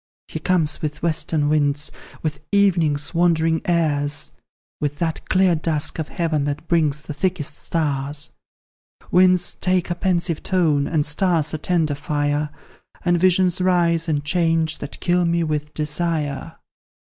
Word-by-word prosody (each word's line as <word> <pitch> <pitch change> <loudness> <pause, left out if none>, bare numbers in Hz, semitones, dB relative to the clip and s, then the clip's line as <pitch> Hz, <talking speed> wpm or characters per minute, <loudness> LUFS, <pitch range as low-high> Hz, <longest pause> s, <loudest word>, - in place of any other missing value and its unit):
"He - - -5
comes 165 -5 0
with 150 0 -4
western 160 -2 +1
winds, 145 -1 +1 0.3
with 150 -2 -2
evening's 170 -8 +2
wandering 165 -2 +2
airs, 145 -4 0 0.5
With 145 -1 -2
that 165 -1 -3
clear 185 -1 +4
dusk 155 -1 -1
of 155 - -2
heaven 160 -4 -1
that 145 +3 -4
brings 150 -3 +1
the 155 - -6
thickest 170 -1 -2
stars. 145 -2 -2 0.8
Winds 180 -1 +4
take 185 -1 0
a - - 0
pensive 175 -2 0
tone, 155 -7 +1
and 155 -3 +1
stars 160 -1 +1
a 155 - -2
tender 160 -3 0
fire, 145 +1 -1 0.6
And 175 -1 +3
visions 185 0 +3
rise, 170 -2 +2
and 145 -2 -1
change, 165 -1 +1
that - - -6
kill 180 0 +2
me 170 0 +1
with 150 -1 -2
desire. 150 -1 -2
160 Hz, 140 wpm, -21 LUFS, 150-175 Hz, 0.8 s, clear